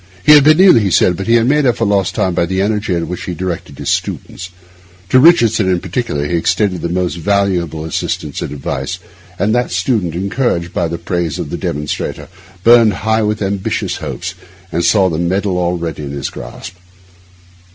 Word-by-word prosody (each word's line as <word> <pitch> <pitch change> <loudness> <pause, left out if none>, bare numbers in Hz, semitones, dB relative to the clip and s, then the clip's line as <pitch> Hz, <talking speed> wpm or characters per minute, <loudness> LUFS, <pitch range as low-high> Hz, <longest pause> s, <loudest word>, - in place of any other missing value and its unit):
He - - +7
had 150 -2 +8
been 155 +3 +5
ill, 185 -7 +7
he 100 -3 0
said; 90 0 +3
but 95 +4 -6
he 115 +1 +5
made 145 +5 +2
up 120 - +1
for 115 - 0
lost 100 -3 0
time 95 - 0
by 85 -1 0
the 95 +1 -2
energy 105 0 -1
with 85 - -1
which 90 +1 -5
he 90 - -4
directed 90 0 -5
the - - -9
students. 90 - -3 0.6
To 130 - +5
Richardson 115 - +4
in 90 -1 +1
particular 90 - -3
he 85 +3 -1
extended 90 +2 0
the 85 - -2
most 90 0 -1
valuable 90 -4 0
assistance 80 - -3
and - - -4
advice, 70 -2 -4 0.4
and 105 +4 +1
that 120 0 +1
student, 90 -2 -1
encouraged 95 -2 -1
by - - 0
the 85 +1 -4
praise 85 -2 -2
of - - -5
the - - -3
demonstrator, 75 +1 -4 0.3
burned 115 -2 +6
high 110 0 +2
with 105 0 -1
ambitious 95 0 -2
hopes, - - -5 0.4
and 85 +1 -1
saw 95 -1 +4
the 80 -3 -2
medal 95 +2 0
already 85 -3 -2
in 70 - -6
his 70 -2 -4
grasp. - - -9
95 Hz, 195 wpm, -15 LUFS, 85-110 Hz, 0.6 s, had